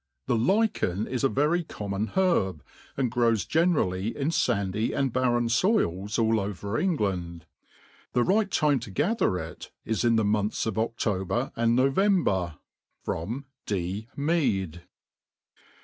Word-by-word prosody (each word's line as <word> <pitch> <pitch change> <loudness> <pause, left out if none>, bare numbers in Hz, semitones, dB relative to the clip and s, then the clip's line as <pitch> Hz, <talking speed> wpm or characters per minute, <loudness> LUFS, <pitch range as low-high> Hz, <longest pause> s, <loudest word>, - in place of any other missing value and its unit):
The 120 - +1
lichen 120 - +1
is 130 0 -3
a 135 - +4
very 150 +6 +1
common 105 -6 -4
herb, 95 - +2 0.3
and 130 -4 0
grow$ 120 -1 +3
generally 110 - 0
in 140 +1 0
fandy 110 - 0
and 135 -3 0
barren 120 -2 +2
foils 115 - +1
all 115 -1 +2
'Over 100 +2 -3
England. 95 - -1 0.7
The 120 - +3
right 205 - +2
time 150 -6 +2
to 115 -1 -8
gather 145 - +1
it 80 -1 -7 0.2
is 110 -3 -1
in 120 -1 +4
the 110 -1 +2
months 105 0 0
of 110 - -1
Odober 110 +1 -1
and 115 0 +2
No 130 +2 +3
vember. 135 - +1 1.1
D. 100 +2 -2
Mead. 110 - 0
115 Hz, 135 wpm, -27 LUFS, 100-140 Hz, 1.1 s, a